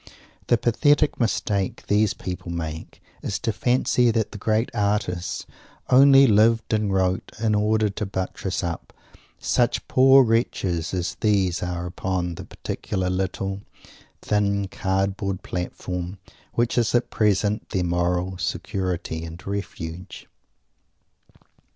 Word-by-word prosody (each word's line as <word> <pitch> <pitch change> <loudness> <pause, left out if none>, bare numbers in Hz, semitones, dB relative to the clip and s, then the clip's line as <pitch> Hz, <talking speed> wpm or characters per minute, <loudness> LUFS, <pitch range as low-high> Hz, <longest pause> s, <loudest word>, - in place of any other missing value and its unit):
The 120 - +4
pathetic 145 +6 +2
mistake 105 -4 -1
these 105 0 +2
people 90 -2 -6
make 80 -1 -6 0.2
is 100 - -2
to 115 - -2
fancy 125 0 +2
that 110 -2 0
the 105 - -8
great 110 +3 0
artists 100 -4 -1 0.5
only 135 +1 +8
lived 115 0 +3
and 105 -2 +1
wrote 95 -1 0
in 110 -1 +1
order 105 +1 +2
to 105 +1 -4
buttress 95 0 -3
up 85 -1 -5 0.4
such - - 0
poor 135 +1 +6
wretches 100 -8 0
as 90 0 -3
these 95 -5 +1
are 90 -1 -3
upon 90 0 -2
the - - -8
particular 95 -2 -3
little, 95 +1 -2 0.6
thin, 100 -1 +1
cardboard 95 0 -1
platform 90 +1 -4 0.4
which 120 +1 +1
is 115 0 +1
at 120 - +1
present 105 0 +1
their 95 -3 0
moral 90 +1 0
security 90 -4 -3
and 85 +1 -9
refuge. 90 -3 -6
100 Hz, 120 wpm, -24 LUFS, 90-110 Hz, 0.6 s, only